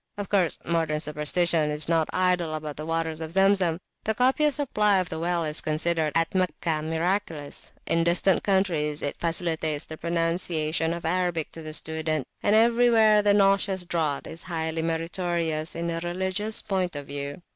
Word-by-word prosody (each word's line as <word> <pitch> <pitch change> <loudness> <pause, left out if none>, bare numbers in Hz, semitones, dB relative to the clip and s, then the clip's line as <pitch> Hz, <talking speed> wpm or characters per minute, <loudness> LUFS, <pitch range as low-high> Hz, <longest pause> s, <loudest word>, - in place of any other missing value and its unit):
Of 205 -1 -5
course 190 -5 +1
modern 160 -2 0
superstition 150 +1 +1
is 150 0 -1
not 165 -1 +1
idle 180 -3 +1
about 150 -1 -5
the 155 +1 -7
waters 165 -1 -2
of 160 0 -5
Zemzem. 195 -3 +3 0.3
The 220 - -1
copious 270 +4 +3
supply 210 -8 +2
of 185 -2 -1
the 160 - -4
well 170 0 0
is 155 0 0
considered 155 0 0
at 165 0 +1
Meccah 175 -4 0
miraculous; 160 -1 -2
in 165 0 +1
distant 175 +2 +3
countries 170 -7 0
it 145 - -3
facilitates 165 -3 -1
the 155 - -8
pron[o]unciation 165 -1 0
of 170 - -9
Arabic 175 -2 -1
to 165 - -9
the 155 -1 -4
student; 160 -3 -2 0.2
and 205 - +3
everywhere 225 -2 +5
the 205 0 +3
nauseous 195 -1 +3
draught 160 -5 -1
is 165 - -8
highly 160 -1 -2
meritorious 165 -1 -1
in 170 0 -2
a 165 - -2
religious 190 +5 -2
point 185 -4 -1
of 145 -1 -5
view. 140 +3 -6
165 Hz, 165 wpm, -26 LUFS, 155-185 Hz, 0.3 s, everywhere